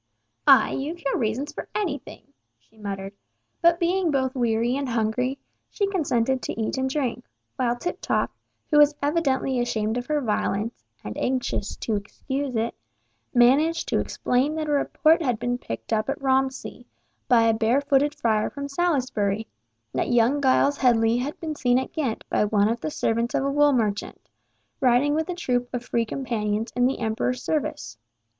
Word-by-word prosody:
"Ay—you've 310 +6 +4
your 275 - +1
reasons 245 +5 -2
for - - -6
anything," 290 -6 -4 0.2
she 220 - -32
muttered, 195 -2 -6 0.5
but 340 0 +4
being 355 0 +1
both 260 -3 0
weary 235 -1 +1
and 275 -1 -2
hungry, 235 +3 0 0.3
she 405 - -1
consented 265 - +1
to - - -5
eat 220 - -1
and 265 0 0
drink, 260 -4 -2 0.3
while 245 -2 0
Tiptoff, 350 +9 -2 0.4
who 295 - +6
was 295 0 +6
evidently 275 -4 +1
ashamed 220 -1 -1
of 245 - -8
her 300 -1 +1
violence, 215 - -2 0.2
and 105 0 -6
anxious 250 -5 -1
to 220 - -2
excuse 265 +6 -4
it, 225 +1 0 0.6
managed 285 +7 +3
to - - +2
explain 265 +5 0
that 310 -1 -2
a - - -1
report 310 +3 +3
had 250 -7 0
been 245 +2 -2
picked 115 - -5
up 215 +3 0
at 275 - -2
Romsey, 265 0 -1 0.4
by 240 -3 +5
a 225 0 +4
bare 225 +4 +2
footed 285 +1 +2
friar 220 -6 +1
from 280 -1 -6
Salisbury, 255 - 0 0.5
that - - -1
young 240 +4 +3
Giles 280 +1 +3
Headley 230 -2 +3
had 270 +5 -3
been 320 -2 -3
seen 245 -4 +2
at 260 - -3
Ghent 270 -9 -2
by - - +1
one 205 0 +2
of 230 +1 -2
the - - -2
servants 235 -4 -1
of - - +1
a 275 - 0
wool 290 +1 +4
merchant, 215 -6 -1 0.6
riding 265 +2 +3
with 315 +3 -1
a 360 - -2
troop 245 -7 -1
of 245 -1 -4
Free 235 -2 0
Companions 225 -3 -2
in 245 0 +3
the 265 - -1
Emperor's 240 +2 -1
service. 120 - -3
255 Hz, 170 wpm, -25 LUFS, 225-285 Hz, 0.6 s, who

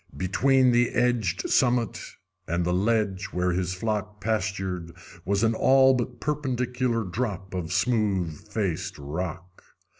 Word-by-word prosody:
Between 130 +8 +3
the 120 0 +3
edged 120 -7 +1
summit 120 -4 +2 0.5
and 85 +1 0
the 90 - +1
ledge 100 -1 +1
where 90 -1 -1
his 90 +1 -1
flock 105 +1 -3
pastured 95 -5 -2 0.3
was 100 +3 +1
an 115 0 +3
all 135 +3 +5
but 125 -1 -3
perpendicular 125 -3 -1
drop 95 -2 -4
of 90 -2 -3
smooth 95 -6 0
faced 95 -2 -2
rock. 85 +4 -6
105 Hz, 125 wpm, -26 LUFS, 90-120 Hz, 0.5 s, all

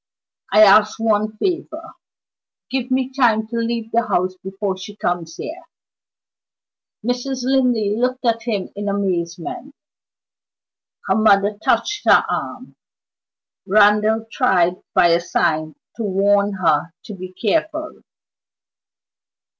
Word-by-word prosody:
I 215 - +7
ask 215 +1 +5
one 215 -1 0
favor 335 - -3 0.8
give 260 -1 -2
me 260 0 0
time 230 -5 +2
to 235 - -6
leave 230 -1 -3
the 235 0 +1
house 185 +1 0
before 195 0 -3
she 190 +2 -10
comes 175 -5 -3
here." 330 - -7 1.4
Mrs. 250 +1 -2
Linley 245 -6 +1
looked 255 +2 -1
at 230 -1 +1
him 220 -5 -3
in 205 0 -3
amazement. 185 - -3 1.3
Her 190 - +1
mother 205 -1 +3
touched 415 - 0
her - - +5
arm; - - -5 0.9
Randal 210 +2 +3
tried 180 -8 +1
by 175 - +5
a 170 0 +4
sign 155 -3 -1 0.2
to 230 - -3
warn 200 +1 +2
her 175 -2 0
to 215 - -9
be 185 -1 -8
careful. 315 - -2
215 Hz, 115 wpm, -20 LUFS, 190-245 Hz, 1.4 s, I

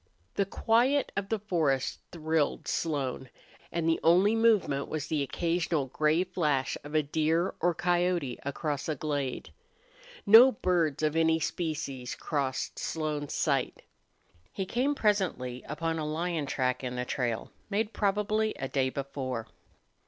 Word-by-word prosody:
The 200 - 0
quiet 245 +7 +2
of 200 0 -2
the 225 - +1
forest 165 -10 0
thrilled 160 -2 -1
Slone. 135 -5 -2 0.4
And 170 -1 -1
the 165 - +2
only 185 +6 +5
movement 215 -12 +2
was 155 -2 -3
the 155 -2 -1
occasional 165 +1 0
gray 155 +6 +1
flash 150 -8 0
of 145 +1 -7
a 155 - +4
deer 160 +4 +1
or 175 0 +2
coyote 175 -7 0
across 145 +1 -3
a 155 - 0
glade. 145 -3 -3 0.7
No 230 +5 +9
birds 170 -7 0
of 155 0 +1
any 160 0 +3
species 155 -6 -3
crossed 135 -4 -2
Slone's 150 -2 -3
sight. - - 0 0.7
He 195 - -3
came, 260 +8 0
presently, 185 - 0
upon 165 +2 -2
a 155 - -2
lion 160 -1 -2
track 130 -1 -1
in 125 -1 -3
the 125 0 -2
trail, 120 -4 -2 0.2
made 210 +2 -1
probably 210 +2 0
a 135 - -4
day 130 -1 +1
before. 130 -4 -4
160 Hz, 140 wpm, -29 LUFS, 140-185 Hz, 0.7 s, No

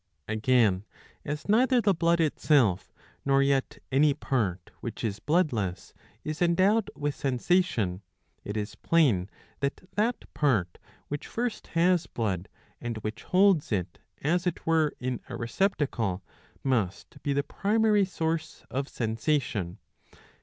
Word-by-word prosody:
Again, 110 -3 +3 0.4
as 150 +1 -4
neither 245 +4 +4
the 205 -3 +3
blood 170 0 +2
itself, 140 - +2 0.3
nor 135 0 +4
yet 140 -1 +1
any 140 +2 +4
part 100 - -1
which - - -6
is 105 -2 -2
bloodless, 115 - 0 0.3
is 155 +2 -4
endowed 190 +5 +3
with 145 0 -1
sensation, 125 - +1 0.4
it 105 +1 -4
is 105 0 -3
plain 120 - +2 0.3
that 140 +6 -3
that 225 +3 0
part 110 - +1 0.3
which 145 0 -5
first 240 -1 -3
has 175 0 +3
blood, 100 -5 -2 0.3
and 120 -2 -3
which 110 +1 -4
holds 185 -6 +4
it 90 -4 -2 0.2
as 175 +5 +1
it 180 - -3
were 160 -2 +3
in 125 -1 -2
a - - -5
receptacle, 115 - -1 0.4
must 110 -9 -1
be 145 - -1
the 140 0 +1
primary 210 +4 +2
source 165 -3 -2
of 135 +2 -2
sensation.' 115 - -1
140 Hz, 130 wpm, -28 LUFS, 110-170 Hz, 0.4 s, neither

